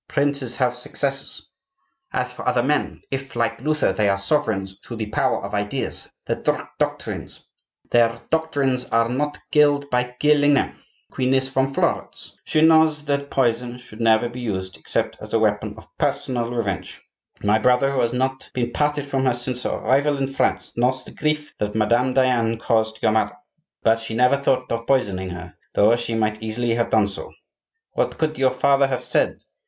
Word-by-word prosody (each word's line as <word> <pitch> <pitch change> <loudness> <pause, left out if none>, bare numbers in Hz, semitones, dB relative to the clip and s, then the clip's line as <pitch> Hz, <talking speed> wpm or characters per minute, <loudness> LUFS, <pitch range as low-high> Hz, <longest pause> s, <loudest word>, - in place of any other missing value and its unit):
Princes 140 -3 0
have 125 -2 +1
successors. 135 +2 -3 0.6
As 125 0 -1
for 125 - -8
other 120 - +2
men, 150 +3 -1
if, 135 -1 -4
like 115 0 -1
Luther, 155 -7 +1
they 100 +1 +2
are 100 - +2
sovereigns 100 -4 0
through 120 - -7
the 110 - -2
power - - +1
of 100 - -8
ideas, 105 0 -2 0.2
their - - -2 0.4
doctrines - - -3 1.5
are 115 0 +3
not 145 +4 -1
killed 145 -1 +4
by 125 0 0
killing 145 -1 +4
them. - - +1 0.4
The - - -26
queen 130 0 +1
is 130 0 +1
from 135 +1 +1
Florence; - - -2
she 155 - +2
knows 160 -2 +5
that 140 -1 -1
poison 125 -1 0
should 120 -3 -12
never 115 +1 +4
be 120 +1 -8
used 95 -6 -3
except - - -2
as - - -9
a - - +4
weapon - - 0
of - - -13
personal 120 -2 -1
revenge. 110 -6 -3 0.4
My 105 +2 +3
brother, 125 +4 +3
who 135 - -1
has 120 -1 +1
not 130 +1 -2
been 120 -1 -1
parted 145 +1 0
from 135 -2 -1
her 125 -2 +3
since 125 +1 -2
her - - -1
arrival 145 +2 +1
in 135 0 -2
France, - - 0
knows 125 +2 +1
the - - -12
grief 150 -1 -2
that 105 0 -2
Madame 120 +4 +2
Diane 120 -4 +2
caused 110 -1 0
your - - +4
mother. 110 +6 0 0.5
But 115 0 +4
she 115 0 -4
never 125 +4 +4
thought 130 -2 0
of 115 0 -3
poisoning 100 -9 +1
her, 90 -1 -8 0.2
though 110 +3 +5
she 120 -1 -2
might 110 -1 0
easily 115 +2 -1
have 115 0 0
done 110 -2 +4
so. 100 -1 -6 0.6
What - - -1
could 155 -2 -1
your 130 -1 +4
father 140 +1 +3
have 130 -2 -2
said? - - 0
125 Hz, 180 wpm, -22 LUFS, 115-135 Hz, 1.5 s, knows